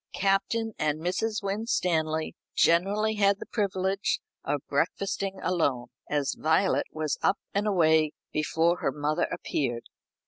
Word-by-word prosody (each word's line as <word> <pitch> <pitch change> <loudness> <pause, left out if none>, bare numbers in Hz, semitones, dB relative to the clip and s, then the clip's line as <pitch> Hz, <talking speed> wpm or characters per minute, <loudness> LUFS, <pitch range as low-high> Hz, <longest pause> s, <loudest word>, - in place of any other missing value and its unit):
Captain 200 +3 +1
and 155 0 0
Mrs. 210 +6 -1
Winstanley 175 -6 0 0.2
generally 205 +6 +3
had 200 -1 +4
the - - -8
privilege 195 -2 0 0.2
of - - -2
breakfasting 195 -1 -1
alone, 140 -9 0 0.2
as 145 -2 0
Violet 160 +5 +2
was 155 -2 -2
up 195 - +3 0.2
and 205 +1 0
away 160 -5 +3 0.2
before 165 +3 +2
her 135 - 0
mother 150 +2 0
appeared. 120 -4 -2
180 Hz, 125 wpm, -28 LUFS, 155-200 Hz, 0.2 s, had